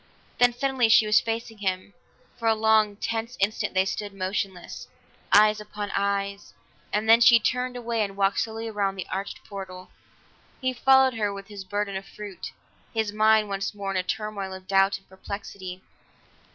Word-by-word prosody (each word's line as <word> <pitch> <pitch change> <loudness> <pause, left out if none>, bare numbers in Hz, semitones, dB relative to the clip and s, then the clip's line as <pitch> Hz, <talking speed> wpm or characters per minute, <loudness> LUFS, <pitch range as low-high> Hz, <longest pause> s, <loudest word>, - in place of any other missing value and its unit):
Then 245 0 +6
suddenly 255 -1 +1
she 220 - +6
was 210 0 +5
facing 225 -1 -4
him; 190 0 -2 0.5
for 230 - -1
a 225 - +4
long, 220 -1 +3
tense 230 +3 -3
instant 200 0 0
they 190 0 +3
stood 205 +1 -4
motionless, 190 -1 -4 0.4
eyes 210 +1 +6
upon 210 -1 -6
eyes, 200 0 -2 0.4
and 210 +1 -1
then 225 +1 +7
she 235 -1 +8
turned 250 +2 -1
away 235 -2 -2
and 195 -1 -5
walked 195 0 +2
slowly 225 0 -3
around 200 -3 -1
to 185 - -3
the - - -16
arched 195 +1 -4
portal. 185 -2 -9 0.7
He 260 -1 -1
followed 265 0 +5
her 210 -3 -1
with 200 +1 -9
his 205 -2 -8
burden 205 +1 -3
of 195 +1 -5
fruit; 205 -4 -8 0.4
his 220 -2 0
mind 215 0 +4
was - - -9
once 195 +1 -3
more 200 -1 -4
in 195 - -1
a - - +2
turmoil 200 0 -4
of 190 0 -11
doubt 195 +1 +3
and - - -24
perplexity. 190 -1 -8
205 Hz, 180 wpm, -26 LUFS, 195-225 Hz, 0.7 s, she